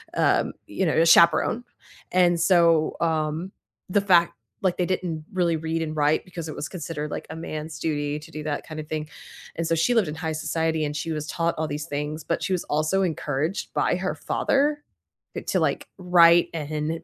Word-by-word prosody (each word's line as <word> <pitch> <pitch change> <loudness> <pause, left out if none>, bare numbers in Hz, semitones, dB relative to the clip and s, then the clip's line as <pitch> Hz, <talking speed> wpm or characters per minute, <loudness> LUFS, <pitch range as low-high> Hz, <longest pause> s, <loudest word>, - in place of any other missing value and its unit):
um, - - +2
you 190 - -2
know, 160 - +1
a 165 - +4
chaperone. 170 +8 +5 0.5
And 175 -2 +3
so, 170 -3 +4
um, 160 +2 -1 0.4
the 200 +2 +3
fact 175 -4 +4 0.3
like, 185 -2 +1
they 180 - +1
didn't 170 -4 -3
really 175 -3 +1
read 160 +1 -2
and 155 -1 -3
write 150 +1 +2
because 170 -3 -7
it 155 - -6
was 150 - -5
considered, 150 -4 -5
like, - - -5
a 160 - -6
man's 155 -1 -6
duty 145 -2 -1
to 155 +2 -12
do 155 0 -6
that 150 -1 -3
kind 155 -1 -7
of 155 - -7
thing, 155 -1 -4 0.5
and 165 0 -1
so 165 - +2
she 165 +10 +2
lived 225 -5 +3
in 150 - -4
high 160 -1 -3
society, 160 0 -1
and 150 0 -4
she 160 +2 -3
was 155 -1 -3
taught 170 0 0
all 155 0 -1
these 150 +1 -4
things, 150 0 -4
but 170 - -2
she 190 - -1
was 180 - -1
also 155 +6 +1
encouraged 160 -1 -2
by - - +1
her - - -2
father, 295 +2 0 0.5
eh, - - -3
to, - - 0
like, - - 0
write 175 -2 +5
and 155 +1 -3
160 Hz, 205 wpm, -25 LUFS, 155-175 Hz, 0.5 s, chaperone